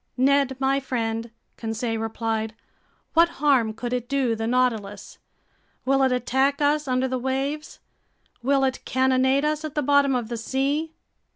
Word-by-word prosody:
"Ned 270 0 +3
my 270 +1 +2
friend," 230 -3 -3 0.3
Conseil 225 0 -3
replied, 225 0 -2 0.6
"what 335 +1 +5
harm 265 -6 +3
could 240 +3 -5
it 245 0 -3
do 265 -4 +1
the 225 0 -3
Nautilus? 225 -5 -1 0.7
Will 270 +1 +3
it 265 -1 +3
attack 265 +3 +1
us 295 0 +1
under 255 0 +1
the 255 0 -2
waves? 270 +4 -3 0.6
Will 270 +2 +2
it 260 -1 -1
cannonade 260 +2 +2
us 305 +1 -1
at 310 -2 -6
the 295 - 0
bottom 280 -1 +3
of 240 -3 -2
the 235 0 -4
sea?" 280 +7 -1
260 Hz, 155 wpm, -24 LUFS, 235-280 Hz, 0.7 s, what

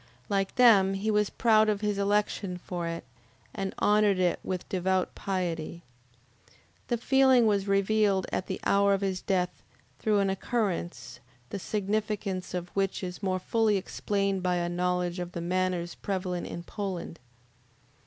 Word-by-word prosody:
Like 195 -1 0
them 200 -6 +6
he 210 +3 -1
was 210 -1 +2
proud 220 -2 +4
of 210 -1 0
his 210 -1 -1
election 200 -2 0
for 175 -1 -5
it, 165 0 -4 0.5
and 195 -1 -3
honored 210 -1 +3
it 180 -2 +1
with 185 -2 -4
devout 185 0 0
piety. 170 -3 -3 1.0
This 240 -1 -2
feeling 265 -3 +5
was 205 -2 +2
revealed 200 -1 +2
at 185 - -2
the 190 - -3
hour 200 0 +4
of 195 - -4
his 190 -2 -1
death 180 -2 -1 0.4
through 215 -1 +2
an 195 -1 +2
occurrence, 175 - -3 0.3
the 200 - -3
significance 205 -2 -2
of 175 0 -4
which 195 0 -1
is 180 0 -5
more 190 -2 0
fully 215 +2 +1
explained 195 0 -1
by 180 0 +1
a 175 0 -1
knowledge 180 0 -1
of 175 0 -5
the - - -4
manners 180 0 -1
prevalent 185 -3 -3
in 170 - -6
Poland. 185 -4 -5
195 Hz, 155 wpm, -28 LUFS, 180-205 Hz, 1.0 s, them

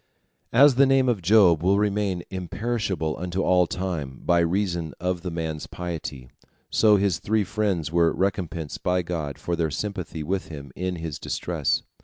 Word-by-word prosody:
As 140 +4 +7
the 140 0 +6
name 135 -1 +3
of 115 -6 +1
Job 90 -3 +5
will 95 +3 +3
remain 100 -3 0
imperishable 95 -3 -2
unto 90 +2 -2
all 90 -1 +4
time, 80 -9 -4
by 85 0 +4
reason 85 -2 0
of 90 0 -1
the 90 - -4
man's 80 -2 -4
piety, 80 -7 -6 0.4
so 105 -2 +5
his 95 -4 +1
three 110 0 +1
friends 100 -5 -1
were 85 -1 +3
recompensed 85 -5 -2
by 90 0 +1
God 80 -5 -4
for 85 - -2
their 80 -1 0
sympathy 85 -1 -4
with 95 +4 -2
him 70 -4 -9
in 90 0 -2
his 80 -3 -5
distress. - - -1
90 Hz, 165 wpm, -25 LUFS, 80-100 Hz, 0.4 s, As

